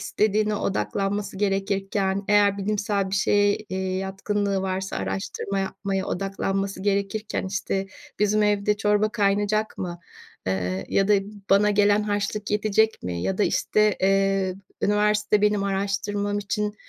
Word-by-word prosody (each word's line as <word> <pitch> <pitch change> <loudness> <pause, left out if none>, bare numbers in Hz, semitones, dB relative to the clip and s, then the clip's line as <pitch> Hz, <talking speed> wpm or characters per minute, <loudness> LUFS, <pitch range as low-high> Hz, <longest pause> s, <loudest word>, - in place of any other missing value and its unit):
istediğine 215 0 +1
odaklanması 195 - -2
gerekirken, 195 0 0
eğer 205 -1 +4
bilimsel 200 -1 -1
bir - - -1
şeye, 205 +1 +3
eee, 200 -3 -7 0.2
yatkınlığı 195 +1 -1
varsa 190 0 -3
araştırma 95 - -3
yapmaya 195 0 -2
odaklanması 195 0 -2
gerekirken, 200 +1 -1
işte, 195 0 -2 0.3
"Bizim 210 +1 +2
evde 210 0 +2
çorba 210 0 +2
kaynayacak 205 +1 0
mı? 175 -2 -4 0.5
Eee, 95 0 -2
ya 195 0 +2
da 210 - +6 0.4
bana 200 +2 +5
gelen 205 0 +3
harçlık 210 0 -2
yetecek 215 +1 +2
mi 85 -1 -3
ya 190 - -1
da, 210 - +3
işte, 215 -1 +2
eee, 195 -1 +2 0.3
üniversite 210 0 +2
benim 210 -1 +2
araştırmam 200 +1 -1
için 210 +1 -2
200 Hz, 130 wpm, -24 LUFS, 195-210 Hz, 0.5 s, da